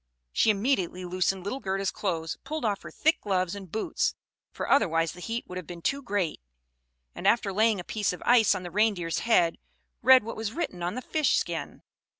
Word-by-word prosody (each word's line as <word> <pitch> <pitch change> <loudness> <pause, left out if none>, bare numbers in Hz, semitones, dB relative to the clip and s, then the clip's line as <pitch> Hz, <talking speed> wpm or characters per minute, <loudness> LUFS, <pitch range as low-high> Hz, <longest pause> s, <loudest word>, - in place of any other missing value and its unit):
She - - +3
immediately 195 -5 0
loosened 185 +1 0
little 205 +8 -3
Gerda's 195 -3 -1
clothes, 165 -5 -2
pulled 305 -1 -4
off 205 -2 0
her - - -9
thick 315 +2 +1
gloves 185 -3 0
and 195 -4 -8
boots; 220 - -1 0.4
for - - -5
otherwise 165 - +3
the 180 - -12
heat 230 +6 -4
would 180 - -7
have 180 - -10
been 170 -1 -9
too 280 0 0
great 200 - -2 0.7
and - - -3
after 215 -4 +3
laying 215 0 +3
a - - -5
piece 210 +2 -1
of 180 - -8
ice 230 -4 +5
on 185 - -5
the 175 - -7
Reindeer's 200 -5 +1
head, 180 -8 +2 0.4
read 260 -2 +7
what 230 - -6
was 220 -1 -4
written 185 - -3
on 175 +4 -2
the 255 - -5
fish 305 +1 +2
skin. - - -4
200 Hz, 200 wpm, -27 LUFS, 180-230 Hz, 0.7 s, read